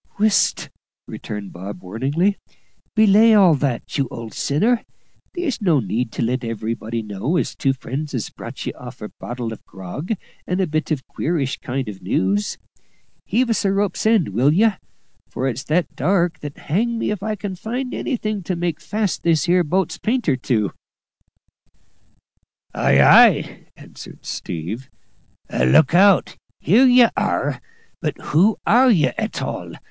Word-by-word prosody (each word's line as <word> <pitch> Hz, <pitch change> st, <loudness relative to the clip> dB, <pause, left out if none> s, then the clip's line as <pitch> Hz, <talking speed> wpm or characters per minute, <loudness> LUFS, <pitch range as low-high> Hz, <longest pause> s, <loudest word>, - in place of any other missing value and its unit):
"Whisht!" 215 Hz, 0 st, +2 dB, 0.4 s
returned 105 Hz, -2 st, -7 dB
Bob 95 Hz, +1 st, -8 dB
warningly. 140 Hz, -, 0 dB, 0.6 s
"Belay 220 Hz, +1 st, +6 dB
all 190 Hz, -5 st, +6 dB
that, 140 Hz, -1 st, -2 dB
you 135 Hz, -, +1 dB
old 115 Hz, -3 st, -8 dB
sinner; 220 Hz, -, +1 dB, 0.5 s
there's 335 Hz, -10 st, -2 dB
no 170 Hz, -8 st, +3 dB
need 115 Hz, +1 st, -2 dB
to -, -, -2 dB
let 125 Hz, +2 st, -1 dB
everybody 115 Hz, 0 st, -4 dB
know 105 Hz, -, -2 dB
as -, -, -1 dB
two 135 Hz, -, 0 dB
friends 140 Hz, +3 st, -5 dB
has 120 Hz, -6 st, -3 dB
brought -, -, -8 dB
ye -, -, -3 dB
off -, -, -11 dB
a -, -, -7 dB
bottle 120 Hz, -2 st, -5 dB
of -, -, -12 dB
grog 95 Hz, -, -5 dB, 0.3 s
and 180 Hz, +1 st, -1 dB
a 190 Hz, -, +2 dB
bit 155 Hz, -1 st, -2 dB
of 150 Hz, -5 st, -2 dB
queerish 145 Hz, -5 st, -2 dB
kind 130 Hz, +1 st, -3 dB
of 100 Hz, -2 st, -8 dB
news. 95 Hz, +2 st, 0 dB, 0.7 s
Heave 235 Hz, +3 st, +1 dB
us 225 Hz, -, 0 dB
a 195 Hz, -, +2 dB
rope's 200 Hz, +1 st, 0 dB
end, 220 Hz, -, +3 dB
will 125 Hz, +9 st, +2 dB
ye? 215 Hz, +8 st, +4 dB, 0.6 s
for 130 Hz, -, -2 dB
it's 130 Hz, +1 st, -3 dB
that 160 Hz, -1 st, 0 dB
dark 175 Hz, -2 st, +1 dB
that 145 Hz, -1 st, -8 dB
hang 230 Hz, +8 st, -1 dB
me 225 Hz, -, -1 dB
if 210 Hz, -, -4 dB
I 215 Hz, +1 st, -2 dB
can 200 Hz, -1 st, -5 dB
find 245 Hz, +7 st, -4 dB
anything 215 Hz, -6 st, -2 dB
to 185 Hz, +1 st, -3 dB
make 170 Hz, -1 st, -2 dB
fast 200 Hz, +5 st, -2 dB
this 160 Hz, -4 st, +2 dB
here 175 Hz, +1 st, +3 dB
boat's 180 Hz, +3 st, -1 dB
painter 225 Hz, -, +1 dB
to!" 115 Hz, -6 st, -1 dB, 2.0 s
"Ay, 70 Hz, -, +3 dB
ay," -, -, +5 dB
answered -, -, -13 dB
"Steve;" 95 Hz, +11 st, -5 dB, 0.6 s
"look 65 Hz, -, +4 dB
out 195 Hz, +1 st, +4 dB, 0.2 s
here 235 Hz, -, +5 dB
ye 245 Hz, -1 st, +7 dB
are! -, -, -1 dB, 0.4 s
But -, -, -2 dB
who 190 Hz, +8 st, +2 dB
are 255 Hz, +4 st, +5 dB
ye 155 Hz, -, +4 dB
at -, -, -4 dB
all? -, -, -5 dB
155 Hz, 155 wpm, -21 LUFS, -, 2.0 s, ye